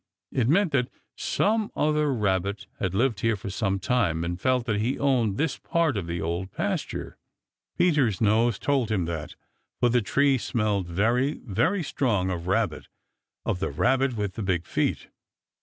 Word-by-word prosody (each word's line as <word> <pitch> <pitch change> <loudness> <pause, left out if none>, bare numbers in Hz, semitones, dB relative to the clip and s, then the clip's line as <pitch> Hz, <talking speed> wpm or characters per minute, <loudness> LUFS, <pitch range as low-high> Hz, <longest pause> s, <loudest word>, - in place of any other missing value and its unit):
It 125 -2 +1
meant 180 +2 +3
that 125 -2 +1 0.3
some 215 0 0
other 150 -1 +2
Rabbit 100 -4 0
had 95 -1 -1
lived 115 -1 +1
here 115 -1 +1
for 100 0 -6
some 100 -1 0
time 95 -6 0
and 90 +1 -4
felt 130 -2 +2
that 105 -3 0
he 125 +5 0
owned 120 -8 +1
this 155 -1 0
part 165 -5 +1
of 95 -5 -3
the 85 0 -3
Old 85 +3 -3
Pasture. - - -3 0.6
Peter's 145 - +3
nose 110 +1 +3
told 135 -3 0
him 100 -6 0
that, 80 -2 -5 0.4
for 120 - +3
the 120 0 +3
tree 135 +5 +2
smelled 105 -6 -1
very, 115 - +1
very 165 - +1
strong 105 -10 0
of 85 -1 -4
Rabbit 95 -3 0 0.6
of 90 - -1
the 95 - -1
Rabbit 130 - +1
with 105 -3 -2
the 110 - -5
big 90 -4 0
feet. - - -1
110 Hz, 170 wpm, -26 LUFS, 95-135 Hz, 0.6 s, meant